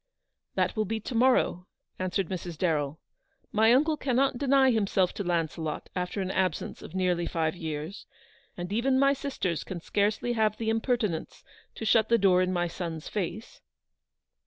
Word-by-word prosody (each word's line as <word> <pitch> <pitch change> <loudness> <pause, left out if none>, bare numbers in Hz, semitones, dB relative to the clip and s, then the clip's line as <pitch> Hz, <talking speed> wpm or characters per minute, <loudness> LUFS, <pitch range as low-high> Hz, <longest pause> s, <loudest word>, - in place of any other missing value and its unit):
" - - -54
That - - +1
will 215 -1 +1
be 220 +3 -2
to 245 - -6
morrow/' 235 -6 +2 0.3
answered 185 0 -1
Mrs. 175 -3 -5
Darrell. 155 -4 0 0.3
" - - -42
My 225 +1 +7
uncle 300 +5 +3
cannot 265 -1 +1
deny 270 -1 +4
himself 200 -5 +1
to 200 - -4
Launcelot 165 -3 -2
after 180 +2 -2
an 190 0 -2
absence 185 -4 -1
of - - -10
nearly 180 -2 +1
five 160 -1 -1
years, 160 +2 -5 0.5
and 175 +2 -4
even 260 +4 +2
my 275 +1 +5
sisters 260 - -2
can 185 - -6
scarcely 210 +7 0
have 215 -2 +1
the 225 -1 -2
imper 225 +3 +1
tinence 200 -9 -4 0.3
to 225 - -5
shut 220 0 +4
the 235 - +5
door 185 -3 +4
in 185 0 +1
my 175 -1 +1
son's 165 -2 -5
face." 210 +3 -4
195 Hz, 175 wpm, -28 LUFS, 175-235 Hz, 0.5 s, My